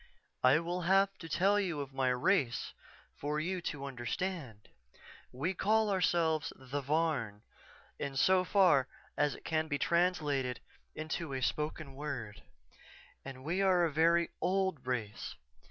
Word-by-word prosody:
"_I 135 +6 +5
will 175 +2 -2
have 195 +3 +3
to 165 - -9
tell 195 +6 +3
you 175 -7 -1
of 140 -1 -5
my 135 -1 +1
race 125 0 +1 0.5
for 150 +1 -1
you 180 +3 -2
to 145 -4 -4
understand. 125 - -4 0.6
We 155 +9 -2
call 215 +3 +2
ourselves 165 -4 +1
the 135 +2 -5
Varn, 140 -8 -1 0.6
in 140 -1 -4
so 185 +7 +4
far 180 -9 +4 0.3
as 145 -1 +1
it - - -15
can 160 -1 0
be 145 -2 -1
translated 150 -8 +1 0.4
into 155 -1 -4
a 130 - -2
spoken 150 0 -2
word, 135 -7 -5 0.8
and 130 -1 -9
we 175 +6 0
are 185 -3 +4
a 165 - -1
very 170 +2 +3
old 190 -6 0
race. 115 -5 -3
155 Hz, 140 wpm, -33 LUFS, 135-180 Hz, 0.8 s, I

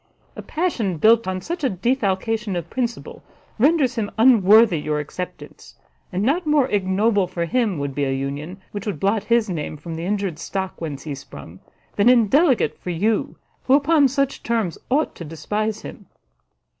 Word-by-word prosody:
A - - -7
passion 255 - -2
built 225 +5 +4
on 185 0 -2
such 345 - -5
a 265 - +3
defalcation 215 0 -1
of 170 -1 -5
principle 240 -2 -4 0.4
renders 280 -1 +3
him 220 -4 -2
unworthy 220 -5 +6
your 150 0 -2
acceptance; 180 +5 -8 0.4
and 185 +2 -1
not 310 +8 +1
more 295 -3 +3
ignoble 200 +1 +1
for 175 -1 -3
him 210 0 0
would 140 -1 -3
be 145 +1 -1
a 135 - -1
union 140 +7 -4
which 205 +1 -6
would 205 - -3
blot 200 +2 0
his 235 0 +2
name 155 -4 -4
from 165 +3 -8
the 165 +1 -5
injured 195 -5 -2
stock 190 +1 -5
whence 145 -4 -5
he 150 - -5
sprung, 95 -9 -11 0.4
than 205 +4 +5
indelicate 250 - +3
for - - -7
you, 205 +6 0 0.3
who 265 - +5
upon 290 0 +4
such 275 +1 -1
terms 225 -8 -1
ought 290 +5 +1
to - - -9
despise 210 +7 -3
him." 200 - -10
205 Hz, 170 wpm, -22 LUFS, 175-240 Hz, 0.4 s, unworthy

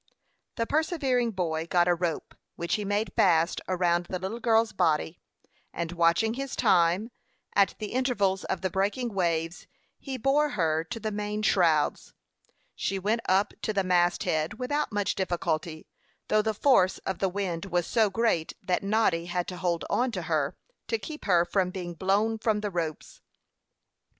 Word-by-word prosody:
The 230 - -1
persevering 275 -5 +1
boy 165 -3 -2
got 175 0 +3
a 175 - +4
rope, 170 -2 -3 0.2
which 170 - -3
he 210 - 0
made 205 +2 -1
fast 170 -2 +3
around 175 -1 +1
the 185 - -3
little 190 +6 -5
girl's 225 -1 +3
body, 160 -1 0 0.5
and 170 -1 -4
watching 170 +6 +2
his 270 +1 -4
time, 185 +1 +3 0.4
at 200 -1 +3
the 210 - -5
intervals 230 -7 0
of 185 - -3
the 185 -1 -1
breaking 210 +5 -1
waves, 170 -2 -1 0.3
he 270 -2 -5
bore 280 +4 +2
her 160 -2 +1
to 235 +3 -6
the 215 0 -3
main 210 +1 -3
shrouds. 165 -7 +2 0.6
She 195 - -2
went 215 +5 0
up 195 +2 +2
to 215 - -2
the 195 -1 +1
mast 175 -1 +2
head 155 +5 -1
without 290 +4 -1
much 205 -1 0
difficulty, 170 -3 -2 0.4
though 215 - +4
the 220 0 -1
force 200 -7 +4
of 190 - -3
the 195 - +1
wind 185 -2 -3
was 175 -2 0
so 220 +1 +2
great 195 -6 0
that 185 -1 0
Noddy 200 -5 +1
had 175 0 -2
to 180 - -6
hold 175 -2 -1
on 250 0 +1
to 185 -4 -3
her, 155 -3 -1 0.3
to 455 - 0
keep 310 -7 -8
her 175 -3 +4
from 185 0 0
being 180 -2 -6
blown 205 +6 +1
from 215 -2 0
the 205 -1 -3
ropes. 165 -3 -4
190 Hz, 170 wpm, -27 LUFS, 175-220 Hz, 0.6 s, a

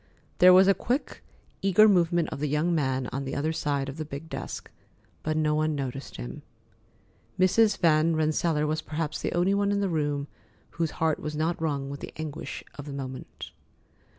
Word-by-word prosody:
There 180 0 +9
was 190 +1 +7
a 195 - +6
quick, 250 +8 -3 0.4
eager 195 +3 +6
movement 175 -4 +3
of - - -6
the 150 - -1
young 155 +4 +1
man 130 -4 0
on 135 +1 -3
the 135 - -4
other 155 +3 0
side 145 -3 -1
of 140 +2 -6
the 155 - -3
big 150 +1 -8
desk, - - -6 0.5
but 155 0 -1
no 155 -1 +2
one 155 0 +1
noticed 135 -1 -5
him. - - -7 1.0
Mrs. 205 +3 +4
Van 160 0 +3
Rensselaer 155 0 +1
was 155 +1 -1
perhaps 155 -1 -3
the - - -1
only 175 +3 +2
one 200 0 +1
in 200 - +1
the 200 -1 0
room 145 -3 -1 0.4
whose 165 -1 -1
heart 160 -1 +1
was 150 0 -5
not 160 +2 -1
wrung 140 -3 -2
with 140 - -6
the - - -8
anguish 155 -2 -6 0.2
of 145 - -7
the 140 - -6
moment. 130 -2 -7
155 Hz, 190 wpm, -27 LUFS, 145-175 Hz, 1.0 s, There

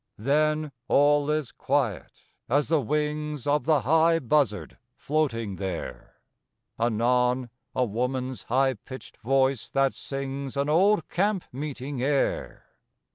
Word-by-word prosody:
Then 150 +5 +1 0.2
all 145 +1 +4
is 150 -5 -1
quiet - - -2 0.3
as 145 +4 +2
the 160 -3 +3
wings 150 +1 -2
Of 145 +1 +1
the 155 -3 +3
high 160 +6 +4
buzzard 125 - 0 0.2
floating 115 -11 -1
there; 95 -2 -6 0.6
Anon 125 +2 +1 0.2
a 125 - +2
woman's 125 +3 -2
high 130 +2 +2
pitched 130 +3 -11
voice 135 +1 +1
that 135 -1 +2
sings 135 0 -5
An 140 +1 0
old 190 +4 +3
camp 195 0 0
meeting 140 -1 -5
air. 140 +1 -1
135 Hz, 120 wpm, -26 LUFS, 125-150 Hz, 0.6 s, all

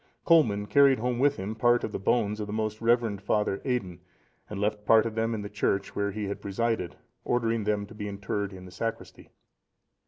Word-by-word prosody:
Colman 115 -12 +4
carried 140 +3 +5
home 120 +1 -1
with 140 +1 +3
him 100 +3 -4
part 120 +2 +3
of - - -3
the - - -4
bones 105 +1 +1
of 105 - -4
the - - -6
most 110 0 -2
reverend 115 -3 +2
Father 100 -1 0
Aidan, 100 -10 -2 0.5
and 105 - -5
left 105 0 -1
part 110 +1 +5
of 115 - -3
them 115 +1 -1
in 105 - -5
the - - -5
church 100 -1 -1
where 100 0 0
he 105 +2 -4
had 100 0 -4
presided, 100 -2 -2 0.3
ordering 115 -3 0
them 105 -1 0
to 100 - -13
be 105 -1 -6
interred 100 0 -3
in 95 -1 -10
the 90 - -12
sacristy. 115 +5 -6
105 Hz, 210 wpm, -28 LUFS, 100-115 Hz, 0.5 s, carried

